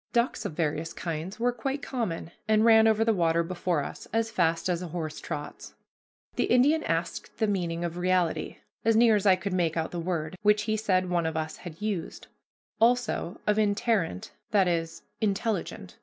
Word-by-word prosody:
Ducks 235 +1 +1
of - - -3
various 160 0 -2
kinds 170 +5 -5
were 245 +1 +2
quite 270 +4 -4
common, 205 -10 -3 0.2
and 215 0 +4
ran 220 -1 +7
over 220 0 +3
the 225 - +3
water 170 -3 +2
before 175 -3 -1
us - - -8
as 225 0 0
fast 165 -2 +1
as 175 -1 0
a 180 - -4
horse 155 -2 -5
trots. 150 -3 -7 0.6
The - - +2
Indian 290 +6 +4
asked 165 +1 -3
the 220 - +2
meaning 175 -5 -1
of 170 0 -3
reality, 180 -2 0 0.3
as 225 0 +3
near 225 -1 +6
as 205 0 +1
I 190 - +7
could 190 +1 -4
make 170 -3 0
out 160 - -1
the 175 - -4
word, 170 0 -3
which 210 0 +3
he 215 0 0
said 185 -4 +1
one 170 -2 +1
of 160 -1 -3
us 155 0 -3
had 165 -3 -10
used; 200 -6 -3 0.5
also 230 -6 +1
of 210 0 +2
interrent, 205 - 0 0.2
that 200 -4 +3
is, 165 -1 -2 0.2
intelligent. 215 +1 -2
185 Hz, 185 wpm, -28 LUFS, 165-220 Hz, 0.6 s, ran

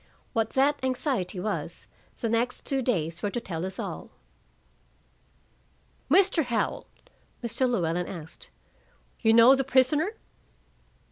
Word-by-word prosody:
What 225 -1 0
that 285 +2 +3
anxiety 255 - -1
was, 210 +4 -4 0.4
the 235 - 0
next 235 +3 -1
two 270 -1 0
days 170 -9 -1
were 205 - -1
to 240 - -3
tell 170 -7 -5
us 190 - -7
all. - - -6 2.0
"Mr. 375 -5 +4
Howell," 235 -2 -2 0.6
Mr. 245 +2 0
Llewellyn 175 -6 0
asked, 160 -4 -9 0.7
"you 225 - +4
know 230 +3 +8
the 270 0 +2
prisoner?" 280 - +2
235 Hz, 120 wpm, -27 LUFS, 190-265 Hz, 2.0 s, know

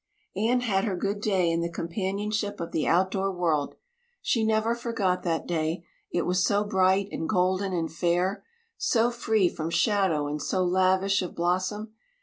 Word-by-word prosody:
Anne 230 +5 +2
had 195 -5 +1
her 205 -3 -1
good 200 +3 -2
day 190 -5 +2
in 165 0 0
the 170 - -1
companionship 200 +5 -3
of 170 - -5
the 155 - -1
outdoor 190 +3 +2
world. 165 -6 0 0.4
She 230 - 0
never 220 +1 +2
forgot 225 -6 -1
that 165 -2 -1
day; 165 0 -2 0.3
it 175 - 0
was 180 +1 +1
so 205 +2 +2
bright 190 -1 +2
and 160 - -4
golden 185 0 +1
and 165 -3 -2
fair, 175 +4 0 0.3
so 235 0 +2
free 220 -5 +2
from 160 -1 -4
shadow 190 -6 +2
and 150 +1 -3
so 185 -1 0
lavish 190 +2 +2
of 180 - -5
blossom. 185 +5 -1
190 Hz, 165 wpm, -27 LUFS, 175-210 Hz, 0.4 s, Anne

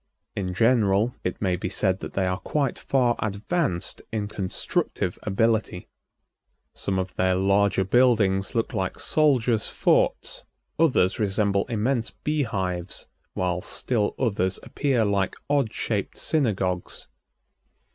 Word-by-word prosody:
In 90 -2 -3
general, 115 0 +3
it 90 - -3
may 95 -3 +1
be 90 - -4
said 95 -2 +1
that - - -7
they 95 - 0
are 90 +1 -1
quite 140 -5 -1
far 125 -3 +2
advanced 110 - -2
in 105 -2 -2
constructive 95 -2 -2
ability. 110 -2 0 0.8
Some 95 -1 -2
of 95 -1 -2
their 95 0 +2
larger 100 +1 +2
buildings 105 -2 +3
look 115 - 0
like 95 -1 -2
soldiers' 125 -7 +2
forts, - - +1 0.4
others 130 - +3
resemble 100 -1 +1
immense 120 +1 0
bee 150 0 -2
hives, 95 -7 -3 0.3
while 90 -1 -1
still 110 0 -1
others 100 -7 0
appear 130 -6 0
like 100 -2 0 0.2
odd 140 -7 +2
shaped 105 -4 -3
synagogues. 95 - -1
100 Hz, 125 wpm, -25 LUFS, 95-120 Hz, 0.8 s, general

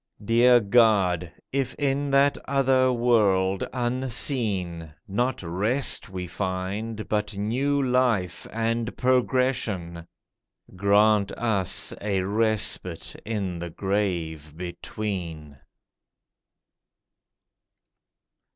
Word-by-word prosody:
Dear 120 +2 +5
God, 100 -6 +2 0.2
if 135 -2 -1
in 140 0 -1
that 140 +1 +4
other 130 -2 +2
world 100 -6 +2
unseen, 115 - -1
Not 120 +4 -1
rest 105 +10 +1
we 90 -1 -5
find, 100 +5 -4
but 105 -1 -2
new 135 +7 0
life 125 -8 0
and 115 +1 -2
progression, 125 -9 0 0.7
Grant 100 +1 +3
us 105 -6 +2
a 100 -3 -1
respite 105 -4 0
in 100 -6 -3
the 85 0 -5
grave 85 -6 -3
between. 85 -5 -6
105 Hz, 80 wpm, -25 LUFS, 95-125 Hz, 0.7 s, Dear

